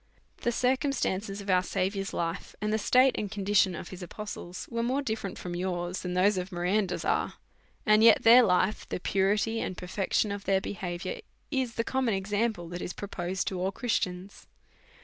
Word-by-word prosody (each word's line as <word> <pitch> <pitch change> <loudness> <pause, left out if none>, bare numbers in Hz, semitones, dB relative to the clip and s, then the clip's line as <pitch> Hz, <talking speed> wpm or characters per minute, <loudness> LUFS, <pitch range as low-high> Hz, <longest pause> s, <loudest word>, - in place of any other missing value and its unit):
The 240 - -1
circum 260 +4 +1
stances 200 -4 -2
of 200 - -8
our 180 0 +5
Saviours 195 +2 -2
life, 170 +1 -3
and 210 0 -1
the 220 - +1
state 255 +5 +5
and 210 - -3
condi 205 0 -3
tion 190 -2 +5
of 170 - -7
his 185 0 -9
apostles, 180 -1 -7
was 230 0 -1
more 260 +4 0
dirferent 220 -6 -3
from 175 -1 -5
yours 175 0 -2
than 180 -1 -3
that 190 +2 +3
of 185 +2 -3
Miranda's 180 +2 0
is; - - +1 0.5
and 215 +1 +5
yet 230 -2 +7
tiieir 240 +1 +8
life, 185 +3 +1
the - - -3
puri 195 +3 +2
ty 225 +2 0
and 185 - -4
perfection 195 +3 0
of 200 -1 -5
their 195 0 +3
beliaviour, 190 - -5 0.3
is 260 -5 -1
the 230 - 0
common 255 -4 0
example 205 -1 -1
that 175 +1 -5
is 175 - -4
proposed 190 -2 -3
to 185 - -4
all 190 +2 0
Christians. 195 -5 -3
195 Hz, 190 wpm, -29 LUFS, 180-220 Hz, 0.5 s, tiieir